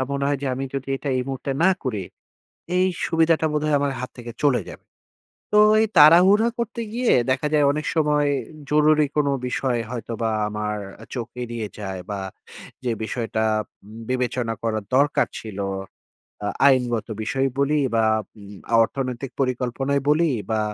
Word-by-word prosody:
আ - - +1
মনে 140 0 -1
হয় 145 - 0
যে, - - -1
আমি 135 - -3
যদি 135 0 -4
এটা 140 - -6
এই 125 - 0
মুহূর্তে 135 +1 -4
না 190 - +6
করি, 110 -7 -2 0.7
এই 185 - +4 0.2
সুবিধাটা 165 -1 +2
বোধহয় 150 0 +1
আমার 140 -1 0
হাত 130 - -5
থেকে 120 -1 -8
চলে 140 -4 +3
যাবে। - - -13 0.7
তো 210 - +6 0.2
এই 220 - +2
তাড়াহুড়া 180 +9 +7
করতে 235 0 -3
গিয়ে 245 0 +2 0.2
দেখা 130 +3 +1
যায় 150 -1 +4
অনেক 150 +2 -3
সময় 150 -2 +2 0.4
জরুরি 150 0 +4
কোনো 145 -2 +2 0.2
বিষয় 125 -1 -1
হয়তোবা 115 -1 -3 0.2
আমার 105 0 -3 0.3
আ - - -11
চোখ 120 -3 -4 0.2
এড়িয়ে 115 -2 -4
যায়। 95 -2 -5
বা 100 - -3 0.6
যে 125 - 0
বিষয়টা 110 -1 -2 0.4
উম 110 +2 -12
বিবেচনা 125 -2 -1
করার 110 -2 -1
দরকার 145 +2 +3
ছিল, 105 -3 -8 0.9
আ - - -1 0.2
আইনগত 125 -4 +2 0.2
বিষয়ই 135 +4 0
বলি, 145 +2 +2
বা 115 -1 +3 0.4
উম 100 0 -11 0.3
অর্থনৈতিক 130 0 -4
পরিকল্পনাই 130 +2 0
বলি। 155 +1 +3 0.2
বা 110 -1 +1
135 Hz, 160 wpm, -23 LUFS, 115-150 Hz, 0.9 s, তাড়াহুড়া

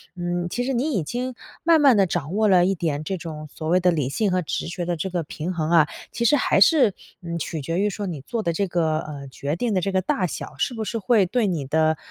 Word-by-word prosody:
嗯， 175 0 -2
其 245 - -2
实 265 +2 -1
你 265 +6 0
已 195 - +1
经 250 - -3 0.3
慢 330 0 +5
慢 270 -6 +6
地 195 - +5
掌 155 -2 -3
握 215 0 +3
了 180 -3 +5
一 195 - +1
点 155 -4 -2
这 190 +5 -3
种， 155 -3 -7
所 155 - -6
谓 180 +3 +4
的 180 0 +3
理 150 -6 -1
性 200 +7 0
和 185 0 +1
直 160 - -3
觉 175 +1 -4
的 175 0 -1
这 165 +4 -3
个 175 -2 -2
平 160 +3 -5
衡 160 -3 -2
啊。 165 -3 +5 0.2
其 235 - -3
实 295 - +5
还 - - +2
是， 280 - +5 0.3
嗯， 170 0 -4
取 160 0 -4
决 165 +6 -2
于 205 +1 +2
说 205 +1 -4
你 160 -6 -5
做 230 - -3
得 170 - 0
这 195 +4 0
个， 160 -3 0
呃， 145 -3 -7
决 140 +3 -3
定 225 +5 -1
的 185 - +1
这 195 - -1
个 190 - +2
大 185 0 0
小， 155 - -6
是 245 - 0
不 220 - -3
是 230 - -3
会 210 0 +3
对 225 +4 +1
你 165 -7 -2
的， 155 +2 +2
175 Hz, 290 characters per minute, -23 LUFS, 160-210 Hz, 0.3 s, 慢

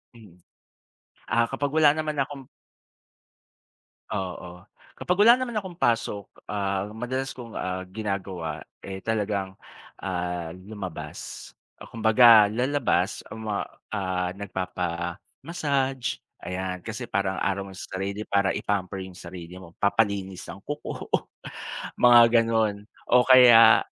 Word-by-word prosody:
Mm. 105 -7 -16 0.9
Ah 115 0 +3
kapag 140 +1 -2
wala 155 -2 +6
naman 155 -1 -2
akong 135 0 -3 1.7
Oo, 90 -2 -5 0.3
kapag 180 +1 0
wala 235 +3 +8
naman 255 -2 -3
akong 190 -4 -5
pasok, 115 - 0 0.2
ah, 100 -1 -1
madalas 125 +4 -3
kong, 115 -2 -9
ah, 95 0 -3
ginagawa, 95 -4 -4 0.2
eh, 95 -1 -6
talagang, 100 -3 -1 0.5
ah, 90 -3 -3
lumabas. 90 - -8 0.2
Ah, - - -11
kumbaga 110 -1 +6
lalabas 120 -5 0
ma, 110 -2 -3 0.3
ah, 95 -2 -1
nagpapa-massage 100 - -3 0.2
ayan 90 0 -4
kasi 115 +4 -6
parang 95 -3 -1
araw 100 0 -1
mo - - -11
sa - - -6
sarili 100 +2 -3
para 100 -1 +2
i-pamper 95 -1 -2
yung 95 - -11
sarili 90 0 -9
mo, 85 -2 -15
papalinis 100 -3 0
ng - - -7
kuko, 145 0 -5 0.9
mga 120 -1 +8 0.2
ganun 110 -3 0 0.3
o 125 - +6
kaya 125 -3 +8
100 Hz, 115 wpm, -26 LUFS, 95-120 Hz, 1.7 s, wala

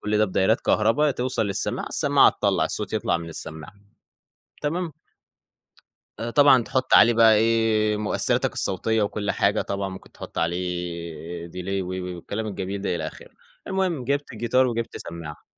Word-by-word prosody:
كل 105 0 0
ده 110 - +5
بدايرات 95 +3 +1
كهربا 125 +8 +2
توصَل 125 -2 -1
للسماعة، 100 - -2
السماعة - - +4
تطلّع، - - +1
الصوت - - -4
يطلَع - - +1
من 85 0 -7
السماعة، 80 +1 -8 0.9
تمام؟ 165 +2 -2 1.3
آآ، 115 - -3
طبعًا 140 -4 +6
تحُط 130 +2 -1
عليه 120 +2 +7
بقى 115 -1 +6
إيه، 110 -1 +2
مؤثِّراتك 105 -1 0
الصوتية 110 +4 0
وكل 105 0 -1
حاجة، 100 +2 +1
طبعًا 100 0 -3
ممكن 95 - -11
تحط - - -10
عليه 85 -1 -3
delay 95 +2 -3
و - - -7
و 90 -1 -4
والكلام 105 +5 -5
الجميل 95 -1 -4
ده، 90 -3 -1
إلى 80 -2 -3
آخِره. - - -11 0.4
المهم، 185 -7 -1
جِبت 140 +1 -1
الجيتار 120 +3 +2
وجِبت 115 -1 -3
سمّاعة. 85 -3 -8
105 Hz, 155 wpm, -24 LUFS, 90-115 Hz, 1.3 s, عليه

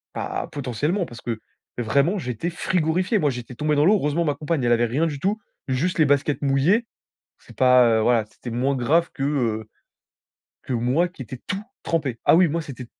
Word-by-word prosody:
Bah - - -3
potentiellement, 145 - -1
parce 120 -6 -11
que 115 -2 -4 0.4
vraiment, 140 - +1
j'étais 125 - -3
frigorifié. 180 +4 0
Moi 150 - +2
j'étais 125 -1 -6
tombé 150 +3 0
dans 145 +2 +3
l'eau. 210 +3 +6
Heureusement 165 -1 0
ma 145 -2 0
compagne, 150 -1 -2
elle 120 - +2
avait 120 0 +3
rien 135 +8 0
du 145 -3 -4
tout, 200 +8 0 0.3
juste 155 +7 -1
les 155 - +6
baskets 145 +1 +1
mouillées. 145 - +2 0.5
C'est - - -17
pas, 125 -1 +6
heu, - - +2
voilà, 115 -1 +3
c'était 120 +3 -10
moins 130 +4 0
grave 160 +7 +2
que, 135 - -5
heu, 115 -7 -1 0.9
que - - -5
moi 125 +9 +1
qui 170 -6 -10
étais 125 +2 -9
tout 195 +2 -3 0.2
trempé. 140 -8 -1
Ah - - +6
oui, 180 -2 +5
moi 165 +3 -1
c'était 130 -4 -8
140 Hz, 200 wpm, -23 LUFS, 125-165 Hz, 0.9 s, l'eau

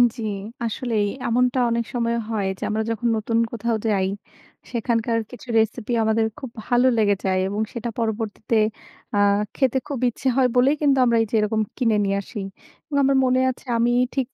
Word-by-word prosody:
জি। 240 - -7 0.4
আসলেই 225 -2 -1 0.2
এমনটা 250 +2 +2
অনেক 235 0 0
সময় 235 -1 0
হয় 210 -4 -1
যে, - - -20
আমরা 215 +1 0
যখন 230 +1 -1
নতুন 225 +1 -1
কোথাও 235 0 -1
যাই 195 -3 +2 0.6
সেখানকার 230 -1 0
কিছু 250 - -11
রেসিপি 225 +2 0
আমাদের 220 0 +2
খুব 260 - -6 0.2
ভালো 245 +1 +3
লেগে 205 -2 +3
যায় 185 -1 +2
এবং 205 +2 -2
সেটা 235 0 -4
পরবর্তীতে 220 0 -1 0.6
আ - - +3 0.4
খেতে 265 -2 +2
খুব 275 -4 -3
ইচ্ছে 245 - -5
হয় 265 -1 +4
বলেই 260 +4 +4
কিন্তু 280 -2 +3
আমরা 235 -1 +3
এই - - +1
যে - - 0
এরকম 215 +1 +1 0.2
কিনে 230 -4 +2
নিয়ে 195 0 0
আসি 205 +2 -7 0.4
এবং 295 - -6
আমার 275 0 +3
মনে 255 0 +3
আছে 250 - -14
আমি 235 +1 +2 0.2
ঠিক 265 -3 0
230 Hz, 180 wpm, -23 LUFS, 220-250 Hz, 0.6 s, হয়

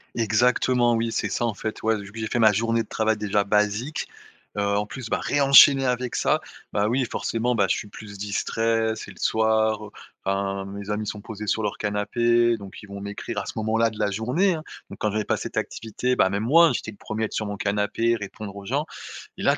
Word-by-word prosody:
Exactement, 120 +2 +3
oui, 115 0 -1
c'est - - -1
ça, 120 - -1
en 115 - 0
fait, 110 +2 -5
ouais, 110 -1 +2
vu 100 0 -11
que 115 - -9
j'ai 110 - -2
fait 120 - -1
ma 110 -2 +6
journée 115 +2 +1
de 110 - -7
travail, 110 -1 0
déjà, 105 -1 +1
basique, 105 +7 0 0.5
heu, - - +1 0.2
en 105 - 0
plus, 125 +1 -8
bah, - - 0
ré-enchaîner 140 -1 +7
avec 125 0 -1
ça, - - +2 0.3
bah, 105 +1 +1
oui, 125 +2 +1
forcément, 120 +1 -1
bah, 100 -3 +3
je - - +3
suis 105 - -5
plus 100 -2 -10
distrait, 110 +2 0
c'est - - -8
le - - -16
soir, 110 -1 +2
heu, 105 - -12 0.3
enfin, 95 0 -1
mes 100 +1 -7
amis 105 +1 -1
sont 105 -1 -5
posés 105 -1 -7
sur 110 - +1
leur 105 -1 -2
canapé, 115 +3 +2
donc 100 -2 -11
ils 105 - -12
vont 100 0 -8
m'écrire 100 0 -6
à - - -5
ce - - -6
moment-là 110 +1 +2
de 110 - -11
la 105 -1 +1
journée, 125 - +1
hein. 155 -1 -5 0.3
Donc - - -10
quand 105 - 0
j'avais 105 0 -1
pas - - 0
cette - - -6
activité, 125 +3 -2
bah, 95 - +3
même 100 +2 -2
moi, 165 +7 +6
j'étais 110 - -4
le 100 - -16
1er 110 +1 -4
à - - +3
être - - -7
sur 110 - -1
mon 100 -1 -4
canapé, 105 +4 +1
répondre 100 -1 -7
aux 100 -1 -9
gens 145 +7 -1 0.5
et - - -6
là, - - +3
110 Hz, 235 wpm, -24 LUFS, 105-120 Hz, 0.5 s, ré-enchaîner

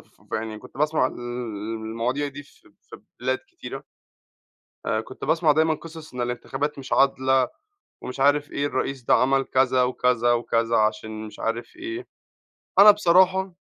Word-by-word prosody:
في - - -25
يعني 110 -1 -3
كنت - - -15
باسمع 150 -3 +2
ال - - -6 0.7
المواضيع 120 +6 -2
دي 145 +1 -9
في 335 - -23
في - - -14 0.2
بلاد - - 0
كتيرة. 355 -1 -8 1.0
آآ - - +1
كنت - - -9
باسمع 160 -1 +3
دايمًا 160 +1 +2
قصص، 160 -2 -11
إن 125 - -4
الانتخابات 135 +4 -3
مش 135 - -8
عادلة، 130 -2 +3 0.5
ومش 125 +2 -7
عارف 145 +1 +3
إيه، 145 +1 -1
الرئيس 135 -1 -2
ده - - +4
عمل 135 +1 +3
كذا، 130 -1 +2
وكذا، 125 -1 +2
وكذا 115 -1 +1
عشان 110 0 -1
مش 105 - -12
عارف 115 - -3
إيه. 335 +3 -6 0.7
أنا 210 +1 +11
بصراحة 190 -1 +3
135 Hz, 155 wpm, -24 LUFS, 120-160 Hz, 1.0 s, أنا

